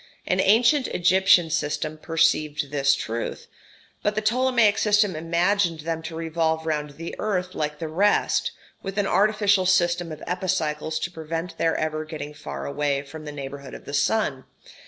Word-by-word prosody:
An 185 Hz, -, 0 dB
ancient 235 Hz, +8 st, +4 dB
Egyptian 180 Hz, -1 st, +4 dB
system 155 Hz, 0 st, -1 dB
perceived 155 Hz, -3 st, +1 dB
this 140 Hz, -1 st, +3 dB
truth; 115 Hz, -2 st, -4 dB, 0.6 s
but 210 Hz, 0 st, 0 dB
the 215 Hz, -, 0 dB
Ptolemaic 235 Hz, -1 st, +3 dB
system 210 Hz, -3 st, +3 dB
imagined 170 Hz, +1 st, +1 dB
them 165 Hz, +1 st, -3 dB
to 160 Hz, 0 st, -7 dB
revolve 160 Hz, -1 st, -1 dB
round 150 Hz, -2 st, -3 dB
the 165 Hz, +1 st, -6 dB
earth 185 Hz, -3 st, -1 dB
like 150 Hz, -1 st, -3 dB
the 160 Hz, -, -4 dB
rest, 195 Hz, +7 st, +2 dB, 0.3 s
with 195 Hz, +1 st, -6 dB
an 205 Hz, -, +2 dB
artificial 205 Hz, -2 st, +3 dB
system 175 Hz, -2 st, +2 dB
of 155 Hz, -, -8 dB
epicycles 160 Hz, -4 st, -1 dB
to 175 Hz, +2 st, -3 dB
prevent 165 Hz, +1 st, -5 dB
their 165 Hz, -1 st, +2 dB
ever 155 Hz, 0 st, -2 dB
getting 150 Hz, -2 st, -7 dB
far 70 Hz, -, -7 dB
away 140 Hz, -, -1 dB
from 155 Hz, +2 st, -10 dB
the 150 Hz, -, -5 dB
neighbourhood 140 Hz, -1 st, -7 dB
of -, -, -12 dB
the 140 Hz, -, -8 dB
sun. 145 Hz, -4 st, 0 dB
165 Hz, 160 wpm, -24 LUFS, 150-190 Hz, 0.6 s, ancient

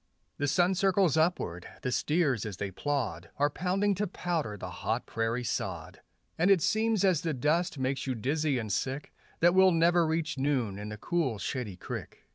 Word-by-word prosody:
The 145 Hz, -, +1 dB
sun 175 Hz, +5 st, +3 dB
circles 190 Hz, -4 st, +3 dB
upward; 160 Hz, -, 0 dB, 0.2 s
the 125 Hz, -, -1 dB
steers 150 Hz, -, +1 dB
as 105 Hz, -4 st, -5 dB
they 100 Hz, -1 st, -3 dB
plod 120 Hz, -, -2 dB
Are 145 Hz, +1 st, +2 dB
pounding 190 Hz, +5 st, +1 dB
to 205 Hz, +2 st, -1 dB
powder 165 Hz, -, -2 dB
the 90 Hz, -1 st, -7 dB
hot -, -, -2 dB
prairie 115 Hz, +2 st, -1 dB
sod; -, -, -4 dB, 0.4 s
And 175 Hz, +4 st, +4 dB
it 190 Hz, -5 st, +5 dB
seems 220 Hz, -2 st, +2 dB
as 180 Hz, -6 st, +3 dB
the 160 Hz, -3 st, -1 dB
dust 160 Hz, +6 st, +1 dB
makes 135 Hz, +1 st, -2 dB
you 130 Hz, -, -1 dB
dizzy 140 Hz, +4 st, 0 dB
and 110 Hz, -4 st, -2 dB
sick 135 Hz, +6 st, -3 dB, 0.3 s
That 175 Hz, +1 st, +6 dB
we'll 190 Hz, 0 st, +6 dB
never 170 Hz, 0 st, +4 dB
reach 160 Hz, -3 st, -1 dB
noon 125 Hz, -8 st, 0 dB
and 105 Hz, +1 st, -6 dB
the 105 Hz, -, -6 dB
cool, 145 Hz, -3 st, -1 dB
shady 110 Hz, -2 st, -4 dB
creek. -, -, -7 dB
150 Hz, 185 wpm, -30 LUFS, 120-175 Hz, 0.4 s, That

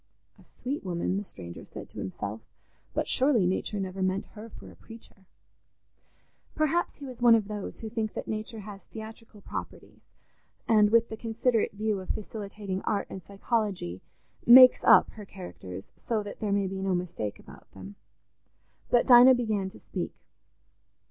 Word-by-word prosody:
"A -, -, -18 dB
sweet 275 Hz, +4 st, -6 dB
woman," 185 Hz, 0 st, -1 dB
the 205 Hz, -, -2 dB
stranger 85 Hz, -, -8 dB
said -, -, -10 dB
to -, -, -10 dB
himself, 100 Hz, +3 st, -5 dB, 0.5 s
"but -, -, 0 dB
surely 260 Hz, -7 st, +3 dB
nature 190 Hz, +3 st, -1 dB
never 190 Hz, 0 st, -4 dB
meant 185 Hz, +1 st, 0 dB
her 220 Hz, +1 st, -10 dB
for -, -, -13 dB
a -, -, -16 dB
preacher." 225 Hz, -4 st, -16 dB, 1.3 s
Perhaps 310 Hz, +3 st, 0 dB
he 285 Hz, -, -10 dB
was 250 Hz, -3 st, -9 dB
one 240 Hz, -1 st, +7 dB
of 215 Hz, -3 st, 0 dB
those 210 Hz, -1 st, -6 dB
who 225 Hz, -, -5 dB
think 220 Hz, -2 st, -3 dB
that -, -, -5 dB
nature 215 Hz, +1 st, -5 dB
has 200 Hz, -1 st, -10 dB
theatrical 220 Hz, -1 st, -11 dB
properties -, -, -8 dB, 0.7 s
and, 210 Hz, -2 st, +5 dB
with 230 Hz, +1 st, +3 dB
the 220 Hz, -, -6 dB
considerate 230 Hz, 0 st, 0 dB
view 210 Hz, 0 st, -1 dB
of 185 Hz, -, -10 dB
facilitating 205 Hz, -2 st, -5 dB
art 210 Hz, -2 st, -1 dB
and 190 Hz, -, -7 dB
psychology, 200 Hz, -, -2 dB, 0.5 s
"makes 255 Hz, +1 st, +9 dB
up," -, -, +6 dB
her 215 Hz, -, -10 dB
characters, 90 Hz, -, -10 dB
so 220 Hz, -3 st, -2 dB
that 205 Hz, -, -9 dB
there 210 Hz, -2 st, -2 dB
may 200 Hz, 0 st, +1 dB
be 190 Hz, 0 st, -4 dB
no 190 Hz, -1 st, 0 dB
mistake 165 Hz, -, -4 dB
about -, -, -16 dB
them. 95 Hz, +1 st, -10 dB, 1.0 s
But 240 Hz, -, +4 dB
Dinah 250 Hz, +1 st, +8 dB
began 215 Hz, -5 st, -1 dB
to -, -, -15 dB
speak. -, -, -5 dB
210 Hz, 165 wpm, -28 LUFS, 190-230 Hz, 1.3 s, makes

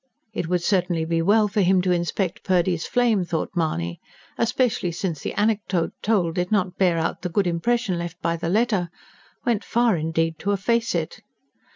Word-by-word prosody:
It 165 Hz, -, -3 dB
would 180 Hz, 0 st, 0 dB
certainly 175 Hz, -4 st, +1 dB
be 165 Hz, 0 st, 0 dB
well 210 Hz, +5 st, +4 dB
for 205 Hz, +1 st, 0 dB
him 185 Hz, 0 st, +4 dB
to 185 Hz, -, +1 dB
inspect 175 Hz, +1 st, -1 dB
Purdy's 175 Hz, -2 st, +1 dB
flame, 235 Hz, -6 st, +2 dB
thought 170 Hz, -2 st, -2 dB
Mahony. 85 Hz, -, -1 dB, 0.4 s
Especially 230 Hz, -6 st, +1 dB
since 170 Hz, -2 st, -3 dB
the -, -, -3 dB
anecdote 205 Hz, -5 st, 0 dB
told 190 Hz, -6 st, +1 dB
did 180 Hz, +2 st, -2 dB
not 185 Hz, -4 st, +1 dB
bear 180 Hz, -3 st, +3 dB
out 165 Hz, 0 st, -2 dB
the 180 Hz, -, -3 dB
good 195 Hz, +3 st, +1 dB
impression 185 Hz, +2 st, 0 dB
left 170 Hz, +1 st, -6 dB
by 170 Hz, -2 st, 0 dB
the 165 Hz, 0 st, -3 dB
letter 205 Hz, -3 st, +1 dB, 0.6 s
went 235 Hz, -4 st, +1 dB
far, 235 Hz, -3 st, +2 dB
indeed, 165 Hz, 0 st, -1 dB
to 205 Hz, -, 0 dB
efface 230 Hz, +4 st, 0 dB
it. -, -, -3 dB
180 Hz, 180 wpm, -23 LUFS, 170-210 Hz, 0.6 s, well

